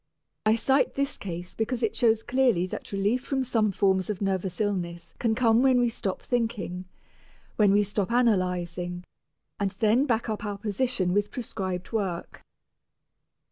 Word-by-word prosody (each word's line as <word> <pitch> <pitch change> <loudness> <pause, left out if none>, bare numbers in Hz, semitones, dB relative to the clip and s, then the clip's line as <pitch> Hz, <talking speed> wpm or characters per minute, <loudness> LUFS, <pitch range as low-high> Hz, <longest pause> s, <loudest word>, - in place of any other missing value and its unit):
I 215 - +5
cite 265 +4 +2
this 280 +1 -1
case 175 -2 -6
because 235 +2 -2
it 225 - 0
shows 225 -2 +3
clearly 245 -8 +2
that 185 - -7
relief 205 +6 0
from 270 -1 -1
some 225 -4 +1
forms 190 -1 +1
of 205 -3 -2
nervous 190 -2 -2
illness 175 -5 -2
can 225 -2 +1
come 230 -1 +4
when 260 -1 +4
we 240 -1 +3
stop 195 -4 -4
thinking, 215 -7 -2 0.7
when 205 -2 +5
we 205 +1 +4
stop 205 0 -2
analyzing, 180 -6 0 0.6
and 200 -1 +1
then 230 +6 +3
back 230 -2 0
up 215 -1 -3
our 205 -1 -3
position 205 -2 0
with 205 +1 +1
prescribed 190 -7 -4
work. 195 -6 -3
210 Hz, 155 wpm, -27 LUFS, 185-235 Hz, 0.7 s, I